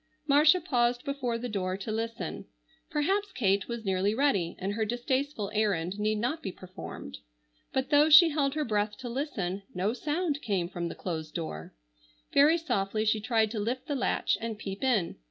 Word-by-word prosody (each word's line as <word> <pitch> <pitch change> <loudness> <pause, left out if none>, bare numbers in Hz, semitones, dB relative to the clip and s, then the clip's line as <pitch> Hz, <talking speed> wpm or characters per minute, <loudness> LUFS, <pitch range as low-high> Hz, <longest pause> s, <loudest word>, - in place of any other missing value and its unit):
Marcia 300 +4 +6
paused 245 -7 +1
before 260 -4 -2
the 245 +2 -4
door 190 -4 -2
to 200 +3 -5
listen. 225 +1 -4 0.4
Perhaps 385 +7 0
Kate 195 -4 +1
was 235 -2 -5
nearly 195 +2 +1
ready 215 -11 +1
and 195 +2 -2
her 220 +1 0
distasteful 245 0 -1
errand 200 -3 0
need 215 +1 +1
not 250 +9 -1
be 190 - -4
performed. 185 0 -9 0.5
But 265 0 -1
though 295 +1 +6
she 315 +2 +9
held 290 -2 0
her 305 -1 0
breath 210 -1 0
to 255 -2 -6
listen, 210 - -3
no 195 +5 0
sound 295 +3 -1
came 195 -6 -1
from 175 -2 -3
the - - -6
closed 160 -4 -5
door. 80 - -5 0.6
Very 300 +4 +6
softly 215 -9 -1
she 215 0 +2
tried 220 -2 +1
to 225 - -3
lift 240 +5 -2
the 300 - -2
latch 260 -3 0
and 225 -1 -4
peep 195 +1 -6
in. 230 -10 +1
230 Hz, 180 wpm, -29 LUFS, 195-280 Hz, 0.6 s, she